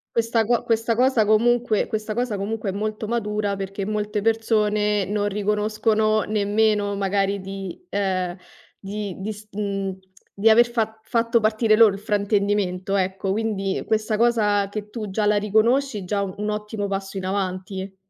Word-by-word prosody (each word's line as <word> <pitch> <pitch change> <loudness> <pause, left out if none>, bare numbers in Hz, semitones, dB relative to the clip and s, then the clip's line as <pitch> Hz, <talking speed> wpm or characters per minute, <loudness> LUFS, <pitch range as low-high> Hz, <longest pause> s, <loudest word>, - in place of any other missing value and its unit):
Questa 230 -1 +2
co 240 +2 +1
questa 225 0 +1
cosa 250 -2 +3
comunque 230 +1 +3
questa 215 -1 -3
cosa 240 -3 -1
comunque 205 +1 -3
è - - -3
molto 215 +1 -3
matura, 210 -3 -1
perché 195 0 -4
molte 210 0 -2
persone 210 -2 +1
non 205 +1 -1
riconoscono 215 +1 +1
nemmeno 210 0 +1
magari 200 0 0
di 195 -1 -7
ehm, 185 -3 -1 0.4
di 200 -1 -5
di 200 +3 -3
s 210 +1 -14
mhmm, 195 -2 -3 0.4
di 220 +3 +5
aver 240 +2 +5
fa 220 -2 -2
fatto 230 +1 +1
partire 215 0 +3
loro 215 -2 +6
il 195 - -6
fraintendimento, 200 -2 0
ecco. 190 0 -1
Quindi 200 -2 -1
questa 215 -1 0
cosa 210 -4 +2
che 210 0 -6
tu 215 -3 -5
già 210 +2 -1
la 210 0 +3
riconosci, 220 +3 +2
già 200 +2 -1
u 190 -1 -4
un 210 +1 -2
ottimo 210 -1 -3
passo 195 0 -4
in 190 - -4
avanti. 190 0 -3
210 Hz, 160 wpm, -23 LUFS, 195-220 Hz, 0.4 s, loro